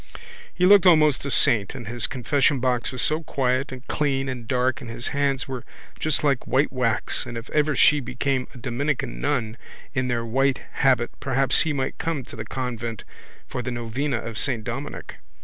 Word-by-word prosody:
He 180 - +1
looked 195 -1 +7
almost 155 -5 +5
a - - -2
saint 110 -6 +3
and 120 - -7
his 120 0 0
confessionbox 130 -1 +1
was 130 - -1
so 155 +1 +1
quiet 130 -2 -1
and 130 0 -9
clean 135 -3 0
and 125 -3 -6
dark 130 +2 0
and 125 - -8
his 115 +2 -4
hands 140 -2 0
were 130 -3 -5 0.4
just 155 -2 0
like 140 -4 +1
white 135 +2 +1
wax 115 -4 0
and 120 - -6
if 115 +2 -8
ever 150 0 +2
she 150 -1 +5
became 130 0 -2
a - - -13
Dominican 125 - -2
nun 115 - -1 0.4
in 130 -2 0
their 120 -2 -1
white 135 +3 +1
habit 125 -3 +2
perhaps 135 0 +3
he 160 - +1
might 135 -2 -3
come 160 -5 -2
to 115 - -11
the 110 - -6
convent 120 -4 -4 0.4
for 125 - -5
the 125 - -4
novena 120 +3 -2
of 115 -1 -5
Saint 120 -6 0
Dominic. 130 +6 -6
130 Hz, 185 wpm, -24 LUFS, 120-140 Hz, 0.4 s, looked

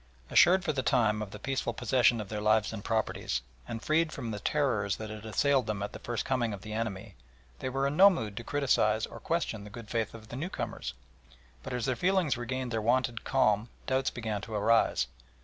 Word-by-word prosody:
Assured 180 +1 +6
for - - 0
the 135 - 0
time 110 -4 +2
of 105 - -4
the 105 - -8
peaceful 135 +5 -2
possession 120 -1 +3
of 105 - -5
their 105 -1 -3
lives 110 +1 +3
and 105 -2 -6
property, 110 -1 -1 0.4
and 115 0 -5
freed 155 +1 +2
from 120 -6 -5
the 105 - -4
terrors 110 -7 +1
that 110 -1 -6
had 110 0 -8
assailed 135 +3 +2
them 105 -2 -2
at 100 - -5
the - - -7
first 120 -1 -3
coming 120 -4 0
of 100 - -8
the 110 0 -6
enemy, 110 -2 -3 0.5
they - - -2
were 135 +1 0
in 140 +1 0
no 195 +2 +10
mood 110 - -3
to 120 - -4
criticise 115 -6 +2
or - - -10
question 165 -11 -2
the 105 - -9
good 110 0 -10
faith 115 -2 -1
of 110 -1 -12
the - - -6
newcomers, 165 +8 -4 0.7
but - - -7
as 125 -2 -1
their 130 - +1
feelings 180 +1 +2
regained 125 +1 -3
their 110 -1 0
wonted 120 0 +1
calm 110 -4 +2 0.2
doubts 130 0 +1
began 110 -3 -3
to 110 +2 -6
arise. 110 - +3
115 Hz, 220 wpm, -30 LUFS, 110-130 Hz, 0.7 s, no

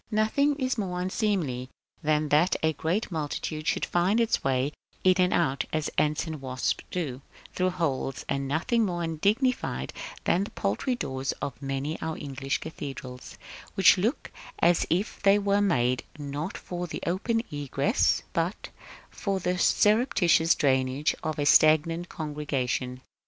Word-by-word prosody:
Nothing 230 +7 +2
is 260 -4 -1
more 180 -3 -2
unseemly 180 - -1 0.3
than 155 -1 +1
that 155 +6 +4
a 160 0 +3
great 180 +8 -1
multitude 155 0 -3
should - - +1
find 185 +6 +2
its 230 -1 +1
way 130 0 +1
out - - -19 0.3
and 185 0 +5
in, 140 -6 +2 0.2
as 155 - -1
ants 150 +1 +1
and 160 -3 -6
wasps 130 -1 -2
do, 145 -8 -3 0.3
through 185 0 +1
holes; 150 -7 -2
and 140 0 -1
nothing 170 - +1
more 175 -4 -1
undignified 205 - 0 0.3
than 185 - +2
the - - -8
paltry 110 - -1
doors 135 - -3
of 135 -2 -6
many 135 +3 -3
of - - -19
our 160 -1 -3
English 135 -1 -3
cathedrals, 135 -5 -8 0.4
which 195 0 +6
look 225 +10 -1 0.3
as 170 0 +3
if 185 +6 -1
they 200 0 +5
were 200 0 +2
made, 125 -10 +2 0.2
not 145 +4 -4
for 175 0 -5
the - - -6
open 225 +6 0
egress, 145 - +1
but - - -2 0.4
for 195 -2 -2
the 180 0 -1
surreptitious 200 - +4
drainage 130 +1 +1
of 155 -1 -3
a 145 - 0
stagnant 160 +3 +4
congregation. 135 -4 -3
160 Hz, 150 wpm, -27 LUFS, 140-195 Hz, 0.4 s, which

